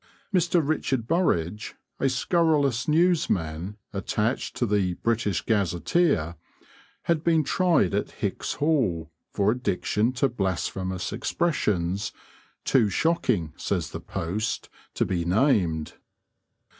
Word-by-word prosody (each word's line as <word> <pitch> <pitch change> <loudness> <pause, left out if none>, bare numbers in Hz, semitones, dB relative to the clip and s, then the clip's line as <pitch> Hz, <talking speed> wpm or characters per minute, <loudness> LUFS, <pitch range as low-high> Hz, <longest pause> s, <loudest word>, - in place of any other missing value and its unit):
Mr. 175 -4 +2
Richard 130 -6 0
Burridge, 105 - 0 0.2
a 135 - +2
scurrilous 140 -3 +2
newsman 105 - +1 0.2
attached 105 +4 -1
to 120 - 0
the 100 -4 +1
British 115 -2 0
Gazetteer, 100 - +1 0.7
had 165 -2 +1
been 165 -2 +3
tried 165 - +2
at - - 0
Hicks's - - -3
Hall 110 - 0 0.2
for 100 0 +2
addiction 115 -1 0
to 130 +2 +2
blasphemous 95 -4 -2
expressions, 105 - 0 0.5
too 115 -6 +3
shocking, 105 - +1
says - - -2
the - - -6
Post, 105 +7 -3 0.3
to - - +1
be 85 -2 -1
named. 90 - +2
110 Hz, 105 wpm, -26 LUFS, 90-150 Hz, 0.7 s, been